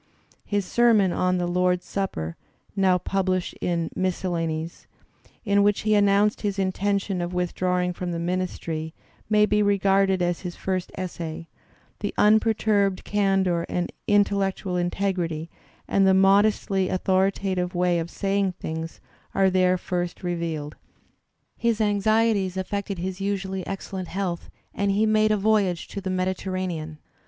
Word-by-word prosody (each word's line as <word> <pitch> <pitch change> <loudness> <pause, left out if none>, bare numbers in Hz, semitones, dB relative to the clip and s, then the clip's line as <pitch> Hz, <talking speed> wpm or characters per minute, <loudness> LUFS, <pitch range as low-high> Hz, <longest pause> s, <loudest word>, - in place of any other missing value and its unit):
His 205 -2 -1
sermon 220 -4 +4
on 185 0 +1
"The 175 - 0
Lord's 180 0 +1
Supper" 85 - -3 0.4
(now 190 -2 +3
published 185 0 -1
in 170 -2 -1
" - - -19
Miscellanies 170 -3 -2 0.3
"), - - -32
in 200 -1 +3
which 205 0 +2
he 215 0 +1
announced 205 0 +3
his 200 -2 -2
intention 195 0 0
of 175 +1 -4
with 180 -1 -1
drawing 180 -1 0
from 175 0 -4
the 170 - -3
ministry, 170 -2 -3 0.3
may 210 -1 +5
be 210 0 +2
regarded 195 -1 +3
as 175 -1 0
his 180 -2 -6
first 185 -1 -3
essay; 165 -3 -5 0.5
the 205 - -4
unperturbed 210 -2 +3
candour 195 -4 +1
and 175 0 -2 0.2
intellectual 200 -2 +1
integrity 175 -3 -1 0.4
and 195 -1 +3
the 190 - +5
modestly 195 0 +3
authoritative 185 -1 0
way 175 -1 +2
of 165 +1 -4
saying 195 0 0
things 160 -2 -6 0.3
are 190 -1 +4
there 185 0 +3
first 175 0 -3
revealed. 165 -4 -3 0.8
His 235 -2 0
anxieties 210 -2 +2
affected 200 +1 -3
his 185 +2 -4
usually 190 -2 -2
excellent 190 -1 -5
health, 180 -1 -3 0.2
and 200 0 0
he 205 +2 +2
made 215 0 +3
a 215 - +2
voyage 200 -4 +1
to 200 - -5
the 190 - -4
Mediterranean. 185 -4 -2
190 Hz, 140 wpm, -25 LUFS, 180-200 Hz, 0.8 s, may